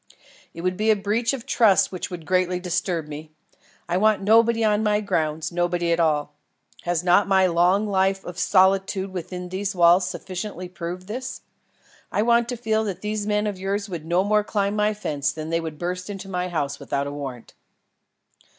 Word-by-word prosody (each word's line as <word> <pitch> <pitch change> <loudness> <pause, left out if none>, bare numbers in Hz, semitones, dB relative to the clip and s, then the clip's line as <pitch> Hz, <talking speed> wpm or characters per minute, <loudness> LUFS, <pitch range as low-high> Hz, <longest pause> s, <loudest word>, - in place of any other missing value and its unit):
"It 165 - -6
would 185 +1 -1
be 215 +1 +1
a 220 - +6
breach 210 +4 0
of 265 -3 -5
trust 200 -7 +4
which 185 - -5
would 175 -3 -7
greatly 185 -1 +1
disturb 175 -2 -2
me. 150 +1 -8 0.6
I 175 +1 0
want 215 0 +3
nobody 230 +2 +4
on 210 -1 +2
my 210 -1 +2
grounds, 160 -6 -1
nobody 175 0 0
at 170 - +2
all. 150 -3 +1 0.5
Has 175 -1 0
not 180 +3 +4
my 190 -1 +4
long 180 +4 +3
life 195 -1 +1
of 175 0 -7
solitude 190 0 +2
within 180 0 -6
these 195 +2 -3
walls 175 +1 +5
sufficiently 185 -1 -6
proved 180 0 -6
this? 255 +6 -6 0.7
I 210 - +1
want 235 0 +3
to 245 - -3
feel 220 -1 0
that 190 -3 -4
these 210 0 -3
men 210 0 +1
of 205 -3 -3
yours 200 +2 -2
would 165 -4 -6
no 175 +2 +2
more 210 +1 +2
climb 205 -1 -1
my 210 0 +1
fence 150 -9 -1
than 155 0 -6
they 165 0 +1
would 160 -2 -6
burst 180 +3 -4
into 195 -1 -6
my 180 -1 -2
house 145 -5 -2
without 140 0 -2
a 140 - -4
warrant." 135 -5 -7
185 Hz, 190 wpm, -24 LUFS, 175-210 Hz, 0.7 s, a